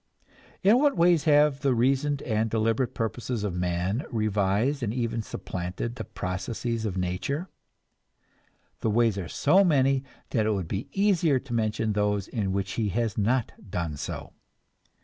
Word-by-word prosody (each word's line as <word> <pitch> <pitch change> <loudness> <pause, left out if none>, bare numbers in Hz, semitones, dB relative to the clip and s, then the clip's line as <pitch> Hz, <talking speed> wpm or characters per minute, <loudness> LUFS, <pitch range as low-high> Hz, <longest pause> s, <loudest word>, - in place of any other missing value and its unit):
In 210 +6 +6
what 285 -1 +3
ways 170 -2 +4
have 150 -2 +4
the 135 -2 +2
reasoned 135 +4 +1
and 110 -1 0
deliberate 115 +3 0
purposes 115 0 -2
of 100 -4 -2
man 90 - -1
revised 110 +5 +1
and 110 -4 -1
even 115 -1 -1
supplanted 95 +2 -5
the 120 -2 -6
processes 110 +6 -3
of 95 -3 -2
nature? 95 - -2 1.3
The 110 - 0
ways 110 -2 +2
are 90 - -4
so 185 +7 +4
many 135 -6 +3 0.3
that 110 -3 +1
it 110 - +2
would 95 -5 -2
be 95 +6 -3
easier 185 -8 +3
to 130 -3 -8
mention 110 -1 0
those 105 -1 0
in 105 -6 -2
which 95 0 -2
he 105 - +1
has 115 +2 -1
not 115 +3 +1 0.2
done 85 -4 -2
so. - - -6
115 Hz, 155 wpm, -27 LUFS, 100-135 Hz, 1.3 s, In